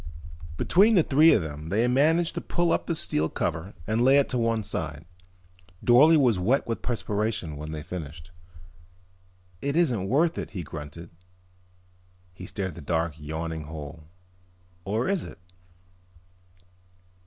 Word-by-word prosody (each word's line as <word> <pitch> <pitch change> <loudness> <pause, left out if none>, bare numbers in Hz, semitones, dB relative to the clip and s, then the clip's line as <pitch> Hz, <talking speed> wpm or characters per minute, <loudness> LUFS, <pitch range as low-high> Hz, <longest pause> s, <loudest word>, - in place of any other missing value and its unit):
Between 210 +5 +4
the 175 - +5
three 155 +4 +5
of 100 - +3
them 75 +1 -7
they 110 +6 +2
managed 160 +7 +2
to - - -4
pull 175 -1 0
up - - 0
the 170 - -1
steel 80 - +1
cover 90 +5 -3
and 110 +4 0
lay 135 +2 +6
it 140 - +2
to 125 - 0
one 115 -1 0
side. 80 -4 -5 0.8
Dorle 150 +7 +6
was 120 -9 +3
wet 120 +10 +1
with 115 - -4
perspiration 105 -7 -2
when 75 +1 -7
they 75 -1 -6
finished. 80 0 -8 1.3
"It 140 +1 -2
isn't 120 - +1
worth 160 +6 +2
it," - - -5
he 90 - -3
grunted. 75 +2 -9 1.2
He 90 0 -10
stared 95 -3 -4
into 85 - -10
the 70 - -16
dark 85 -1 0
yawning 80 +1 -5
hole. 75 0 -9 0.8
"Or 110 +5 -1
is 195 -4 0
it?" - - -10
100 Hz, 150 wpm, -26 LUFS, -, 1.3 s, lay